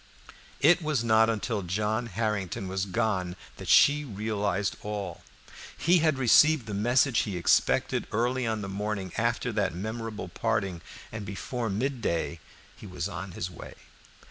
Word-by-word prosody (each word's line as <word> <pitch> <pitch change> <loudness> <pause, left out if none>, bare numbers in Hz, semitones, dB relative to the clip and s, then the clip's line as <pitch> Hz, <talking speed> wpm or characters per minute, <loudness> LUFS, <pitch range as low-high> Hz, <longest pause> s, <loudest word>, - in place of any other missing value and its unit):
It 170 +5 +6
was 150 -7 0
not 110 -1 +4
until 110 -1 -1
John 105 +6 -1
Harrington 100 -3 -2
was 95 +1 -2
gone 95 -2 -1 0.2
that - - -8
she 145 +1 +6
realized 105 -4 -2
all. 100 -4 -5 0.6
He 175 +2 +4
had 155 -3 +2
received 135 +2 +5
the 110 - -6
message 120 +4 +3
he 100 -4 -2
expected 85 - +2
early 120 +2 0
on 110 -1 -1
the - - -4
morning 100 -1 -3
after 120 +2 0
that 100 -5 -1
memorable 110 +3 -5
parting, 90 -4 -1 0.3
and 110 -1 -5
before 115 +4 -4
mid 125 +6 -2
day 85 -3 -1 0.4
he - - -11
was 90 -1 -4
on 95 -2 -6
his 90 +1 -4
way. - - -10
105 Hz, 150 wpm, -28 LUFS, 95-120 Hz, 0.6 s, It